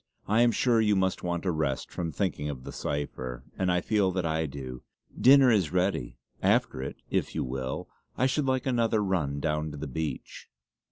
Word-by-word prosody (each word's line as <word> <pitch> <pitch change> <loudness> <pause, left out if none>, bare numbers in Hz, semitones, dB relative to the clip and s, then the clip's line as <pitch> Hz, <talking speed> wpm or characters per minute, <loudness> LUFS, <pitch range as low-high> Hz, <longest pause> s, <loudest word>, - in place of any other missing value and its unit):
I 110 +3 +3
am 120 0 +5
sure 115 -1 +3
you 105 -2 +3
must 95 -1 +1
want 85 0 -2
a 90 - +2
rest 75 -5 -2
from 85 -2 -3
thinking 80 -7 -2
of 65 -3 -6
the - - -7
cipher, 65 -4 -4
and 95 -1 +1
I 90 0 +2
feel 105 -1 +2
that 90 -2 -1
I 80 0 0
do. 65 -3 -7 0.3
Dinner 135 0 +7
is 95 -9 +2
ready; 90 -8 0 0.2
after 65 - +2
it, 65 - -5 0.2
if - - -1
you - - 0
will, 65 +1 -4 0.3
I 130 - +3
should 135 +2 +1
like 130 -1 +1
another 115 -4 +2
run 80 -8 0
down 75 0 -1
to - - -8
the 75 - -5
beach." 75 +3 -5
90 Hz, 200 wpm, -28 LUFS, 70-105 Hz, 0.3 s, Dinner